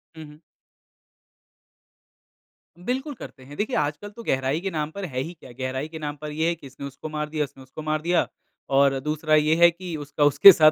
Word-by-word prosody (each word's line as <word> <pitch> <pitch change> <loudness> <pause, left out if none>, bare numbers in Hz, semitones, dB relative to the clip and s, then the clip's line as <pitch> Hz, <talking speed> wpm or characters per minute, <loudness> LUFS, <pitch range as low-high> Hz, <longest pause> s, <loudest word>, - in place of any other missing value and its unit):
हुँ, 160 - -9
हुँ। 150 +1 -14 2.5
बिल्कुल. 265 +4 -2
करते 135 - -11
हैं 145 +2 -11
देखिए 220 +5 -1
आजकल 150 +7 -1
तो 230 +3 -11
गहराई 135 +1 0
के 195 - -2
नाम 155 -1 -2
पर 200 +1 -5
है 130 -6 -4
ही 165 +6 -4
क्या, 130 -6 -14
गहराई 130 +3 -2
के 160 0 -8
नाम 145 -1 -4
पर 150 0 -5
ये 160 +2 0
है 170 - 0
कि 140 - -12
इसने 135 +1 -9
उसको 140 +3 -7
मार 150 0 -3
दिया, 155 -1 0
उसने 135 -1 -9
उसको 130 +4 -9
मार 155 0 -1
दिया 175 +1 +2 0.5
और 140 -1 +4
दूसरा 155 +2 +1
ये 155 +1 +4
है 170 0 +7
कि 175 -1 -6
उसका 145 0 -2
उसके 145 +7 +10
साथ 155 -2 +6
155 Hz, 215 wpm, -25 LUFS, 145-170 Hz, 2.5 s, उसके